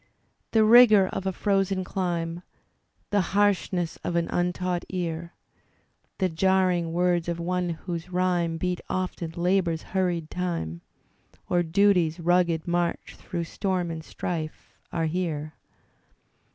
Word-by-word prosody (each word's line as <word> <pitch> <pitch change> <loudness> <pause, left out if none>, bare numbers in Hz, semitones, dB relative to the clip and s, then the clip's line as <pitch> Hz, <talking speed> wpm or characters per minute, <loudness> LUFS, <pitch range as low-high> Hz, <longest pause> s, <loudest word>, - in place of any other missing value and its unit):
The 220 -1 +4
rigour 215 -4 +7
of 195 - -4
a - - +1
frozen 195 0 0
dime. 175 -2 -2 0.7
The 205 -1 +3 0.2
harshness 185 -4 +1
of 175 - -2
an 170 -1 0
untaught 180 0 -1
ear. 170 -2 -4 0.8
The 190 - +2
jarring 180 -1 +2
words 175 0 +1
of 170 0 -2
one 180 +1 -1
whose 170 +1 -5
rhyme 180 -2 0
Beat 180 +1 -2
often 185 -2 -2
Labour's 175 -2 +1
hurried 175 -4 -1
time. 165 - -3 0.7
Or 175 - +4
Duty's 175 -1 +3
rugged 170 -1 +2
march 175 0 -1
through 170 -1 -4
storm 180 0 -2
and 160 -1 -6
strife, 160 -1 -5 0.2
are 165 -1 0
here. 155 -3 -2
175 Hz, 125 wpm, -26 LUFS, 165-185 Hz, 0.8 s, rigour